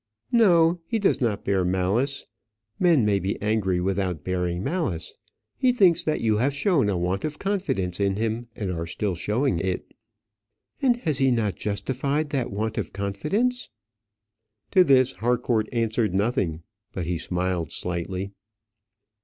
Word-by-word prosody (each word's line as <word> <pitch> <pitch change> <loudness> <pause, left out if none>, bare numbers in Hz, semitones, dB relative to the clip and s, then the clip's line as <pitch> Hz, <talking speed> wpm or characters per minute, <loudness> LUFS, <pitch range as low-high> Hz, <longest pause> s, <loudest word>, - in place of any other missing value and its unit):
"No, 175 -7 +5
he 230 - 0
does 200 -8 +1
not 110 -5 -1
bear 95 -2 +2
malice; 95 +10 0 0.5
men 165 - +4
may 100 -2 +2
be 95 +2 -2
angry 105 -4 0
without 90 -4 -1
bearing 90 -1 -1
malice. 135 - -2 0.4
He 255 - +3
thinks 190 -9 +4
that 155 - -1
you 110 -2 +2
have 135 +5 +1
shown 145 - +2
a 95 - 0
want 90 +3 -1
of 155 -1 -3
confidence 140 - -2
in 100 -1 +1
him, 115 +2 -2
and 100 -4 -3
are 85 -1 -3
still 100 +3 -2
showing 105 - 0
it." 90 +1 -3 0.9
"And 250 -3 +3
has 150 -4 +1
he 135 -1 +4
not 115 -5 +1
justified 135 +9 -2
that 130 -4 -1
want 110 +2 -2
of - - -5
confidence?" 155 - -1 1.0
To 185 -2 +6
this 135 -4 +4
Harcourt 120 -2 0
answered 115 -4 0
nothing, 95 - 0 0.3
but 90 - -3
he 85 0 -2
smiled 90 -2 -2
slightly. 90 +2 -3
110 Hz, 150 wpm, -25 LUFS, 95-140 Hz, 1.0 s, To